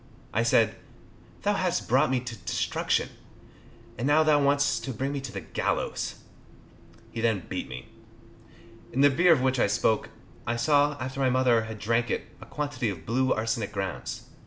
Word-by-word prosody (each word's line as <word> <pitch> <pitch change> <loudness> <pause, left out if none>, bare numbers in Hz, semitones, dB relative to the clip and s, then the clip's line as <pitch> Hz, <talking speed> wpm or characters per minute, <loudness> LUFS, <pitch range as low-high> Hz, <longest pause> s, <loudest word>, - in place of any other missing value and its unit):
I - - +2
said, - - +3 0.7
"Thou 205 - +2
hast 185 -3 -1
brought 130 +1 +3
me 130 -1 +1
to 120 -2 -6
destruction, 100 - -1 0.9
and 125 - 0
now 150 +2 +5
thou 150 -2 +4
wants 145 0 +2
to 135 - -5
bring 135 +5 -2
me 140 -1 -3
to 135 -2 -6
the - - -5
gallows." - - -2 1.0
He 115 - -4
then 110 -6 +1
beat - - -4
me. 65 -1 -8 1.0
In 135 - 0
the 145 0 +6
beer 175 +6 +4
of 150 -6 +5
which 130 -1 +1
I - - +4
spoke, 110 - +1 0.4
I 120 - 0
saw, 145 +4 +3
after 130 +1 -5
my 130 -1 +3
mother 125 -3 +3
had 110 0 -7
drank 115 +3 0
it, - - -1 0.2
a - - -11
quantity 145 -6 -2
of 85 -5 -7
blue 130 +3 +1
arsenic 110 -1 -1
grounds. 95 -2 -4
130 Hz, 180 wpm, -27 LUFS, 115-145 Hz, 1.0 s, the